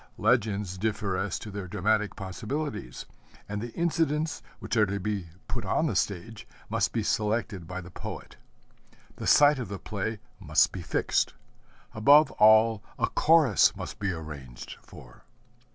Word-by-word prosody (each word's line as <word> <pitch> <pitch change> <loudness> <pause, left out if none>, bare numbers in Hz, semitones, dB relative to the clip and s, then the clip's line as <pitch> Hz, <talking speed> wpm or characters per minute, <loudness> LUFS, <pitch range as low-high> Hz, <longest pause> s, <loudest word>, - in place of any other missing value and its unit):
Legends 100 -6 +1
differ 105 -2 -1
as 95 0 -2
to 105 - -8
their 100 -2 -6
dramatic 105 +3 0
possibilities, 110 - -5 0.4
and 105 0 -4
the 120 +1 -6
incidents 160 -2 0 0.2
which - - -4
are 110 -2 +4
to 100 +1 -2
be 100 -2 -3 0.2
put 120 -2 -4
on 100 +11 +1
the 130 -10 -1
stage 100 +3 -3 0.2
must - - +1
be - - -1
selected 105 -5 -1
by 90 +2 -5
the 90 +1 -12
poet. - - -8 0.8
The - - -5
site 145 -1 +6
of 125 - -4
the 100 +1 -5
play 105 +3 -4 0.2
must 75 -6 +3
be - - -6
fixed. - - 0 0.6
Above 145 +8 +6
all, 110 0 +6 0.2
a - - +2
Chorus 150 - +4
must - - -7
be 100 -2 -1
arranged 75 -7 -8
for. - - -15
105 Hz, 150 wpm, -28 LUFS, 95-115 Hz, 0.8 s, site